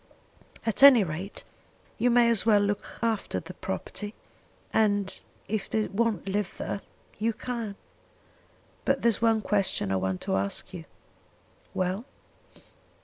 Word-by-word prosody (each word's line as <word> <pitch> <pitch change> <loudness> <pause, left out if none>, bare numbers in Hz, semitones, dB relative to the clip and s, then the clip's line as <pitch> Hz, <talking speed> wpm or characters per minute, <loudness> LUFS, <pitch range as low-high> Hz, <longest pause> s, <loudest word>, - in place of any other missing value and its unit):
At 225 +1 +1
any 270 -6 +9
rate, 180 +4 -5 0.6
you 245 - +3
may 240 0 +5
as 225 - +4
well 215 -2 +5
look 205 0 -2
after 225 -3 0
the 170 +2 -9
property; 205 +3 -5 0.6
and 205 -3 +1 0.3
if 205 -1 -2
they 220 -1 0
won't 215 -3 0
live 200 0 -2
there, 200 - -4 0.4
you 225 +2 +1
can. 230 -3 -4 1.1
But 275 0 +1
there's 230 -3 +3
one 225 -1 +3
question 195 - +1
I 95 - +2
want 95 0 -1
to - - -1
ask 100 - -2
you." 170 -3 -7 0.9
"Well?" 185 +5 -1
205 Hz, 135 wpm, -28 LUFS, 190-225 Hz, 1.1 s, any